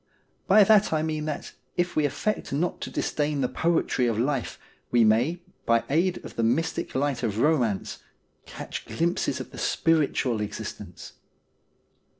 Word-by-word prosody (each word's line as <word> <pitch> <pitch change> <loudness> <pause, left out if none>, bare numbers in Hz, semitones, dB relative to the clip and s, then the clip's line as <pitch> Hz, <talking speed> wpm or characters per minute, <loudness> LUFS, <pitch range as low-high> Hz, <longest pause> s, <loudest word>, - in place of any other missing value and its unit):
By 210 +2 +7
that 210 0 +5
I 155 -1 +1
mean 155 -1 -2
that, 155 -1 -4 0.3
if 175 0 0
we 155 - +2
affect 175 +10 -2
not 160 +6 -1
to - - -4
disdain 145 -1 -1
the 125 - +2
poetry 160 -6 +1
of 115 -2 0
life, 130 +1 -1 0.3
we 120 -1 +4
may, 120 +11 +2 0.3
by 115 -1 +3
aid 175 +4 +1
of - - -10
the - - +1
mystic 160 +9 0
light 140 -1 0
of 110 -4 -2
romance, 120 -7 +1 0.5
catch - - -7
glimpses 170 +2 -1
of - - -7
the - - -9
spiritual 145 -8 +1
exist 105 0 -5
ence. - - -11
150 Hz, 155 wpm, -26 LUFS, 120-165 Hz, 0.5 s, By